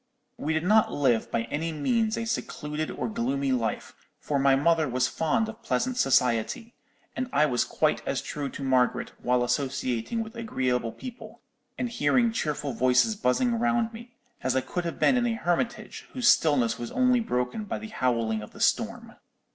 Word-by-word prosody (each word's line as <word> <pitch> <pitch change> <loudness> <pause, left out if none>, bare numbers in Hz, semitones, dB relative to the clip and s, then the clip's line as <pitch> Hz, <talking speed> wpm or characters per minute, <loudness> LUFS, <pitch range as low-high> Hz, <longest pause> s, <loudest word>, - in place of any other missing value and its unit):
We 155 - -1
did 160 0 0
not 215 +4 +4
live 125 -6 +1
by 115 - 0
any 165 +3 -1
means 220 - 0
a 230 - -2
secluded 155 -8 -3
or 125 - -3
gloomy 135 +5 -1
life, 115 -4 -2 0.3
for 145 -2 -1
my 135 0 +4
mother 155 +1 +2
was 130 +1 +1
fond 220 +8 0
of 225 0 -9
pleasant 255 -1 -1
society: 135 - +1 0.4
and 255 0 -3
I 150 - +4
was 125 -5 +1
quite - - 0
as - - 0
true 145 -2 -4
to 140 - -7
Margaret 130 -2 +1
while 125 0 +2
associating 130 - -1
with 220 +1 -11
agreeable 125 - -1
people, 250 - -10 0.4
and 250 - -1
hearing 235 0 +2
cheerful 150 - -2
voices 130 - +3
buzzing 225 - +1
round 240 -1 +1
me, 235 +1 -11 0.3
as 130 0 0
I 130 - +3
could 175 +6 -4
have 170 - -4
been 260 - +4
in 240 -1 +2
a 230 - 0
hermitage 200 +4 -2
whose 255 -2 0
stillness 125 - +4
was 120 - -5
only 255 -1 +3
broken 125 - -2
by - - -3
the 220 - -8
howling 115 - 0
of 105 - -11
the - - -13
storm. - - 0
150 Hz, 180 wpm, -27 LUFS, -, 0.4 s, not